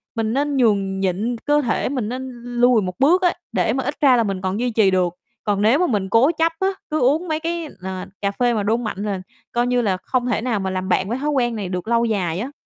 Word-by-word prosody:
mình 225 Hz, -1 st, -1 dB
nên 285 Hz, +1 st, 0 dB
nhường 200 Hz, -5 st, +2 dB
nhịn 195 Hz, +6 st, -1 dB
cơ 295 Hz, 0 st, +3 dB
thể, 240 Hz, -2 st, -1 dB
mình 250 Hz, -6 st, -2 dB
nên 260 Hz, +2 st, -5 dB
lùi 245 Hz, -1 st, +3 dB
một 180 Hz, -1 st, -4 dB
bước 340 Hz, +7 st, +4 dB
á, 355 Hz, -, +3 dB, 0.2 s
để -, -, +1 dB
mà 265 Hz, +1 st, -1 dB
ít 285 Hz, +4 st, -3 dB
ra 270 Hz, -4 st, +6 dB
là 235 Hz, -, +3 dB
mình 195 Hz, -3 st, -3 dB
còn 190 Hz, +2 st, -2 dB
duy 245 Hz, +1 st, 0 dB
trì 215 Hz, -4 st, +3 dB
được. 180 Hz, -2 st, +1 dB, 0.3 s
Còn 205 Hz, -2 st, 0 dB
nếu 225 Hz, +8 st, +4 dB
mà 360 Hz, -, +2 dB
mình 200 Hz, -5 st, -1 dB
cố 245 Hz, -, +4 dB
chấp 325 Hz, +1 st, +3 dB
á, 380 Hz, -, +2 dB, 0.2 s
cứ 310 Hz, -, +1 dB
uống 295 Hz, +8 st, +2 dB
mấy 310 Hz, -1 st, -1 dB
cái, 335 Hz, 0 st, -3 dB
ờ, 185 Hz, 0 st, -5 dB, 0.2 s
cà 200 Hz, -1 st, 0 dB
phê 240 Hz, +3 st, +1 dB
mà 210 Hz, -2 st, 0 dB
đô 220 Hz, +3 st, +2 dB
mạnh 230 Hz, -5 st, -4 dB
là 200 Hz, -3 st, -2 dB, 0.3 s
coi 240 Hz, +1 st, +1 dB
như 245 Hz, 0 st, +2 dB
là 195 Hz, -4 st, 0 dB
không 245 Hz, +6 st, -2 dB
thể 225 Hz, -3 st, 0 dB
nào 230 Hz, -3 st, -1 dB
mà 190 Hz, -1 st, -2 dB
làm 185 Hz, 0 st, -3 dB
bạn 190 Hz, +1 st, +1 dB
với 240 Hz, -, -1 dB
thói 295 Hz, +3 st, -2 dB
quen 245 Hz, -5 st, +1 dB
này 200 Hz, -4 st, -4 dB
được 180 Hz, +2 st, -4 dB
lâu 235 Hz, 0 st, +2 dB
dài 185 Hz, -7 st, -1 dB
á. 250 Hz, +7 st, -4 dB
235 Hz, 270 wpm, -21 LUFS, 195-265 Hz, 0.3 s, ra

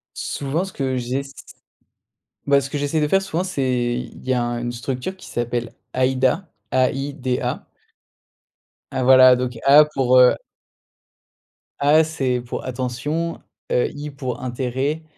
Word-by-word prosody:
Souvent 145 Hz, +6 st, -2 dB
ce 190 Hz, -, -10 dB
que 130 Hz, -2 st, -2 dB
j'ess 135 Hz, +3 st, -3 dB, 1.1 s
bah, 140 Hz, 0 st, +5 dB
ce 135 Hz, -, -5 dB
que 150 Hz, -, -2 dB
j'essaie 145 Hz, +2 st, 0 dB
de 150 Hz, -, +2 dB
faire 195 Hz, +5 st, +3 dB
souvent, 180 Hz, -2 st, -2 dB
c'est 125 Hz, -8 st, -1 dB
il -, -, -15 dB
y 130 Hz, -, +2 dB
a 125 Hz, -1 st, +1 dB
un 120 Hz, 0 st, -2 dB
une 120 Hz, -, -3 dB
structure 125 Hz, +8 st, -4 dB
qui 185 Hz, -, -14 dB
s'appelle 120 Hz, -1 st, -3 dB, 0.2 s
AIDA, 130 Hz, +7 st, +1 dB, 0.2 s
A 130 Hz, 0 st, +3 dB
I 135 Hz, +2 st, -4 dB
D 130 Hz, -3 st, -2 dB
A. -, -, -3 dB, 1.3 s
Ah, 130 Hz, -, -1 dB
voilà, 130 Hz, 0 st, +7 dB
donc 125 Hz, -1 st, -3 dB
A 145 Hz, +2 st, +8 dB
pour, 130 Hz, -4 st, +3 dB
heu 125 Hz, 0 st, +7 dB, 1.4 s
A 150 Hz, +3 st, +5 dB
c'est 135 Hz, -6 st, -1 dB
pour 120 Hz, -, -6 dB
attention, 130 Hz, +6 st, -3 dB, 0.3 s
heu, 125 Hz, -, +2 dB
I 150 Hz, +1 st, -6 dB
pour 130 Hz, -3 st, -5 dB
intérêt, 130 Hz, +5 st, -2 dB
130 Hz, 155 wpm, -21 LUFS, 125-145 Hz, 1.4 s, A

